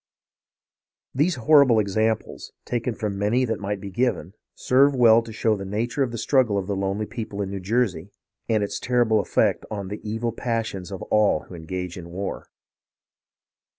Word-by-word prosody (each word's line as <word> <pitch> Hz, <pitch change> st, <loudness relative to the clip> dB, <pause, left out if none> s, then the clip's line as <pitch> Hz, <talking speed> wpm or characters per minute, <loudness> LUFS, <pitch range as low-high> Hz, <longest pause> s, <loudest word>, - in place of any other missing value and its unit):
These 155 Hz, +6 st, +2 dB
horrible 140 Hz, -2 st, +5 dB
examples, 110 Hz, +2 st, -1 dB
taken 120 Hz, -1 st, -2 dB
from 100 Hz, -2 st, -3 dB
many 115 Hz, +6 st, +2 dB
that 115 Hz, -, -2 dB
might 100 Hz, 0 st, -3 dB
be 100 Hz, 0 st, -8 dB
given, 100 Hz, -6 st, -1 dB, 0.2 s
serve 135 Hz, +2 st, +3 dB
well 115 Hz, -2 st, +6 dB
to 115 Hz, -1 st, -10 dB
show 110 Hz, 0 st, +1 dB
the 100 Hz, -, -6 dB
nature 115 Hz, +7 st, -2 dB
of 130 Hz, -, +2 dB
the 120 Hz, -, -5 dB
struggle 120 Hz, -4 st, +2 dB
of 95 Hz, -, -2 dB
the 100 Hz, +1 st, -2 dB
lonely 100 Hz, +2 st, -2 dB
people 105 Hz, -1 st, -6 dB
in 100 Hz, -1 st, -2 dB
New 100 Hz, -, -4 dB
Jersey, 100 Hz, -3 st, -1 dB, 0.4 s
and 110 Hz, -2 st, +2 dB
its 100 Hz, -, -3 dB
terrible 120 Hz, -3 st, +2 dB
effect -, -, +1 dB
on 100 Hz, -3 st, -5 dB
the 105 Hz, -, -6 dB
evil 115 Hz, +2 st, -2 dB
passions 115 Hz, -6 st, -3 dB
of 95 Hz, -, -6 dB
all 105 Hz, -7 st, +3 dB
who -, -, -14 dB
engage 90 Hz, +2 st, -5 dB
in 85 Hz, -1 st, -10 dB
war. 95 Hz, +3 st, -5 dB
110 Hz, 175 wpm, -24 LUFS, 100-120 Hz, 0.4 s, well